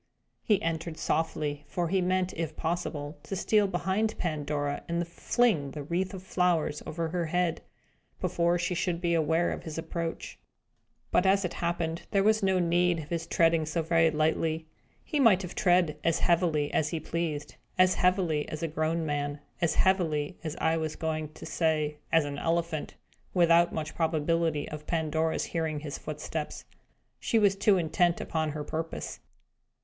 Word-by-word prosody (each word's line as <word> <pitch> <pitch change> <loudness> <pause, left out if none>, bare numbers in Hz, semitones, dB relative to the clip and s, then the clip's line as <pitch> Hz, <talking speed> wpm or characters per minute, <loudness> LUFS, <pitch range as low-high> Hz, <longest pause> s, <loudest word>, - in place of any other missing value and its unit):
He 210 -3 +3
entered 165 0 -2
softly, 150 -2 -1
for 175 +1 -2
he 190 +1 +2
meant, 185 0 +1
if 160 -2 -4
possible, 160 -3 -3
to 195 - -5
steal 210 +2 +3
behind 190 +4 0
Pandora, 145 -3 -2
and 170 0 -1
fling 175 - +1
the 150 - -5
wreath 180 +6 -2
of 185 - -8
flowers 180 -5 +1
over 165 0 -2
her 170 0 -1
head, 175 0 0 0.6
before 170 0 +1
she 175 +1 -1
should 175 -1 -1
be 170 -1 0
aware 165 +1 +2
of - - -4
his 160 -1 -7
approach. 165 0 -4 0.7
But, 185 - +3
as 195 0 +4
it 175 - -3
happened, 170 -1 -2
there 195 -1 +2
was 215 +1 +4
no 190 -1 +2
need 175 0 +2
of 155 -2 -7
his 165 -1 -3
treading 165 -1 +3
so 165 +1 -1
very 165 0 +4
lightly. 160 +1 0 0.4
He 300 - -2
might 210 -7 +5
have 180 - -6
trod 175 -4 +3
as 165 -1 +2
heavily 165 -4 +2
as 150 - +2
he 165 - -2
pleased 155 -2 -3 0.2
as 185 0 +5
heavily 180 -5 +1
as 155 +1 -5
a - - +1
grown 160 +1 -1
man 145 -1 -2 0.2
as 170 - +2
heavily, 165 -6 +2 0.2
I 160 0 +2
was 160 -1 -2
going 155 -1 -3
to - - -10
say, 155 -2 0
as 165 -2 +4
an 145 0 -4
elephant 165 -2 -1 0.4
without 170 -1 +5
much 155 -1 -4
probability 160 -1 0
of 150 0 -8
Pandora's 160 -1 0
hearing 160 -3 -2
his 145 -2 -5
footsteps. 150 0 -5 0.5
She 230 - +1
was 205 -3 +4
too 200 0 +4
intent 175 +1 +2
upon 155 -2 -2
her 150 -1 -4
purpose. 160 +2 -4
165 Hz, 165 wpm, -29 LUFS, 155-180 Hz, 0.7 s, might